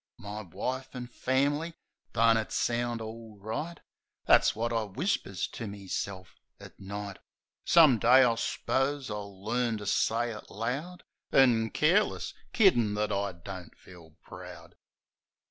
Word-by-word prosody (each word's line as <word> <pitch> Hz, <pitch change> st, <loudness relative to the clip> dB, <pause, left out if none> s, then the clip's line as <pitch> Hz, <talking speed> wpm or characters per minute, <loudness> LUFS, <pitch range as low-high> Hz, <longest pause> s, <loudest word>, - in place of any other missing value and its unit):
My 105 Hz, +1 st, -6 dB
wife 125 Hz, +9 st, -5 dB
an' 125 Hz, -1 st, -6 dB
f -, -, -21 dB
am'ly! 145 Hz, +5 st, +1 dB, 0.4 s
Don't 115 Hz, 0 st, +5 dB
it 110 Hz, -1 st, -1 dB
sound 120 Hz, -1 st, 0 dB
all 110 Hz, -1 st, -8 dB
right! 115 Hz, +12 st, -5 dB, 0.5 s
That's -, -, +5 dB
wot 115 Hz, +2 st, -1 dB
I 115 Hz, -, +1 dB
whispers 100 Hz, -, -2 dB
to 115 Hz, -, -6 dB
meself 100 Hz, -1 st, -6 dB, 0.2 s
at -, -, -13 dB
night. 100 Hz, 0 st, -6 dB, 0.5 s
Some 155 Hz, -9 st, +6 dB
day, 130 Hz, +4 st, +7 dB
I 120 Hz, -2 st, +4 dB
s'pose, 135 Hz, +3 st, -1 dB
I'll 100 Hz, -2 st, -7 dB
learn 120 Hz, 0 st, 0 dB
to 105 Hz, -, -8 dB
say 115 Hz, +3 st, +1 dB
it 105 Hz, -, -9 dB
loud 140 Hz, -, -4 dB, 0.3 s
An' 120 Hz, -4 st, +4 dB
careless; 175 Hz, -, +2 dB, 0.2 s
kiddin' 120 Hz, -, +4 dB
that 105 Hz, 0 st, -1 dB
I 100 Hz, 0 st, 0 dB
don't 90 Hz, 0 st, -9 dB
feel 85 Hz, -4 st, -16 dB
proud. -, -, -11 dB
115 Hz, 140 wpm, -29 LUFS, 100-130 Hz, 0.5 s, day